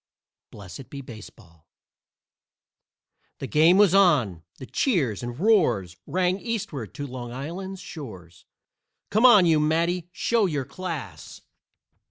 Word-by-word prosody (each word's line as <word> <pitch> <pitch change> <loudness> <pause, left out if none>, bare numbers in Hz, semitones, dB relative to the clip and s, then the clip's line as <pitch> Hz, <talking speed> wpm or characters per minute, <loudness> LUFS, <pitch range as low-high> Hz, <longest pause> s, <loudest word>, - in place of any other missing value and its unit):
BLESSED 100 +5 -11
BE 140 - -8
BASEBALL 105 - -14 1.7
The - - -6
game 160 +6 +4
was 200 -3 +5
on! 145 - +3 0.2
The 130 - -9
cheers 140 - 0
and 120 +1 -6
roars 125 - +2
Rang 185 +1 0
Eastward 170 - -5
to 145 -1 -5
Long 125 -3 -7
Island's 180 +9 -6
shores; 95 - -11 0.7
"Come 220 +5 +5
on, 210 -7 +7
you 160 -2 +3
Matty 170 +3 0
show 215 +5 +1
your 145 -6 -3
class!" 140 - -7
150 Hz, 120 wpm, -25 LUFS, 120-185 Hz, 1.7 s, on